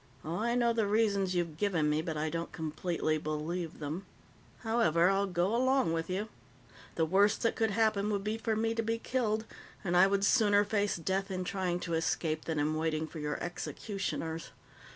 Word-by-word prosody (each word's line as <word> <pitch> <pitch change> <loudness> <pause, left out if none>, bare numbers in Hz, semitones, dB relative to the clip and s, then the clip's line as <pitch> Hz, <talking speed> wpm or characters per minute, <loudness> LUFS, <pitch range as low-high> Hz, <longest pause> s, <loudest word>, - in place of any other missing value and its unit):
Oh 165 +3 -2
I 235 +3 0
know 235 -1 +3
the 225 -3 +1
reasons 200 -3 +2
you've 170 -3 -1
given 180 -7 +1
me, 150 +1 +2
but 160 -2 -4
I 155 +1 -1
don't 165 0 -3
completely 160 0 -1
believe 155 +3 -3
them. 160 +6 -5 0.5
However, 195 -7 +3
I'll 200 +1 +1
go 185 +4 +1
along 260 -7 +2
with 165 +1 -2
you. 195 +4 -2 0.7
The 165 - +2
worst 200 +5 +3
that 230 - +2
could 225 -1 +1
happen 210 -1 +2
would 200 -2 -1
be 215 +2 -2
for 225 -1 0
me 225 +1 +1
to 230 - 0
be 225 +1 -1
killed, 225 -3 -1 0.4
and 175 -3 0
I 185 +2 +7
would 200 0 +1
sooner 205 -3 +4
face 205 -1 0
death 190 +4 -1
in 185 -1 -2
trying 180 -1 -1
to 170 - -3
escape 160 -1 0
than 160 -2 -2
in 150 +1 +1
waiting 155 0 0
for 160 0 -8
your 150 0 -2
executioners. 175 -2 -4
190 Hz, 195 wpm, -31 LUFS, 160-215 Hz, 0.7 s, I